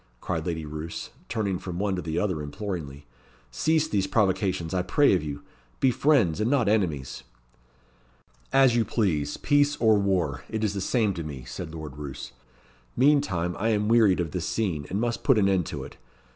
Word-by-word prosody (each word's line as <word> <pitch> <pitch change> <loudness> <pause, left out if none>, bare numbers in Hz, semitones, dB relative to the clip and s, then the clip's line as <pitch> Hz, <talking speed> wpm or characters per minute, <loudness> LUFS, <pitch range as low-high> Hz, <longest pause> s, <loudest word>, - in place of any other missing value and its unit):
cried 80 +5 -3
Lady 80 -2 -3
Roos, 75 +2 -6 0.2
turning 100 -5 -1
from 90 -2 -6
one 100 0 0
to 90 - -3
the 80 0 -3
other 90 -5 0
imploringly. 75 -3 -6 0.5
"Cease 155 - +1
these 100 -9 0
provocations, 95 -5 0
I 90 - +1
pray 145 +9 +3
of 90 - +2
you. 70 -2 -6 0.4
Be 130 - +4
friends, 120 - +2
and 110 - +1
not 130 -6 +2
enemies." 80 - 0 1.3
"As 135 -3 +5
you 120 - +3
please 85 -10 -1
peace 145 0 +2
or 110 -6 +4
war; 90 -8 0
it 110 0 -3
is 105 -2 +1
the 100 - -3
same 110 0 +1
to 85 -2 -5
me," 70 -4 -7
said 80 +5 -7
Lord 75 -3 -8
Roos. 70 -3 -7 0.7
"Meantime, 120 - +2
I 110 +3 +1
am 105 -1 +1
wearied 110 -6 +5
of 85 -3 -2
this 90 +1 -3
scene, 85 -10 -2
and 100 - -1
must 120 0 -2
put 135 -5 +4
an 100 -2 +4
end 95 -4 +1
to - - -5
it. - - -11
95 Hz, 185 wpm, -26 LUFS, 80-110 Hz, 1.3 s, As